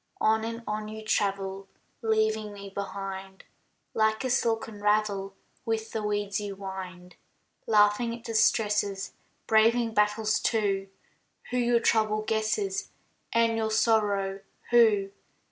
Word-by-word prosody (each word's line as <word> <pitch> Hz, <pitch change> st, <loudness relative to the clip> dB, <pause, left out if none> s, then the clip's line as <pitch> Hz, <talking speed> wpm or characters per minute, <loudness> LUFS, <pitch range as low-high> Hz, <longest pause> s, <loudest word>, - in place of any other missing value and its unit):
On 220 Hz, 0 st, +2 dB
and 230 Hz, +1 st, -5 dB
on 215 Hz, 0 st, -3 dB
you 220 Hz, 0 st, -8 dB
travel, 195 Hz, -2 st, -1 dB, 0.3 s
Leaving 220 Hz, -1 st, +1 dB
me 200 Hz, -1 st, -9 dB
behind, 195 Hz, -1 st, -6 dB, 0.5 s
Like 220 Hz, +2 st, +1 dB
a 260 Hz, -, -1 dB
silken 225 Hz, -3 st, -1 dB
ravel 205 Hz, -2 st, +1 dB, 0.3 s
With 225 Hz, -2 st, -2 dB
the 220 Hz, -, -2 dB
weeds 205 Hz, -1 st, -1 dB
you 200 Hz, -1 st, -5 dB
wind. 185 Hz, -2 st, -8 dB, 0.5 s
Laughing 210 Hz, +2 st, +4 dB
at 235 Hz, -, -18 dB
distresses; 210 Hz, -3 st, +1 dB, 0.3 s
Braving 225 Hz, +1 st, +3 dB
battles, 210 Hz, +1 st, +2 dB
too; 195 Hz, -4 st, 0 dB, 0.6 s
Who 250 Hz, -, 0 dB
your 240 Hz, -1 st, +3 dB
trouble 215 Hz, -1 st, +2 dB
guesses, 215 Hz, -3 st, -1 dB, 0.4 s
And 230 Hz, 0 st, +3 dB
your 220 Hz, -1 st, 0 dB
sorrow 205 Hz, -3 st, +1 dB, 0.3 s
who? 215 Hz, -5 st, +4 dB
215 Hz, 120 wpm, -28 LUFS, 200-220 Hz, 0.6 s, Laughing